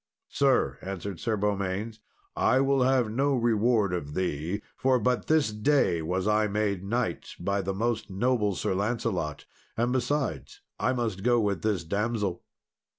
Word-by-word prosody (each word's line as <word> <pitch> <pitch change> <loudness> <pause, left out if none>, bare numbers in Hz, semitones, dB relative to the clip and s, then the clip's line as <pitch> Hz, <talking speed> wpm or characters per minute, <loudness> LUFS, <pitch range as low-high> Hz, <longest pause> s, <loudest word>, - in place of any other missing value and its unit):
"Sir," 125 - +2
answered 95 -1 -5
Sir 110 +2 -1
Beaumains, 100 +2 -2 0.4
"I 130 - +3
will 135 0 +2
have 125 -3 +2
no 135 +4 +1
reward 115 -4 +2
of 75 -5 -4
thee, 90 +2 -2
for 130 -1 +2
but 125 +1 0
this 155 -7 +3
day 105 - +2
was 90 +4 -1
I 105 0 +3
made 100 -2 -1
knight 120 +4 -2
by 100 +3 0
the 95 0 -3
most 115 +2 -1
noble 105 0 +1
Sir 95 - -1
Lancelot; 100 -6 -2 0.3
and 120 +2 +1
besides, 130 - -2 0.2
I - - +2
must 115 -6 -2
go 120 +2 +3
with 100 -6 0
this 100 -5 0
damsel." 100 +1 -1
105 Hz, 155 wpm, -28 LUFS, 95-120 Hz, 0.4 s, I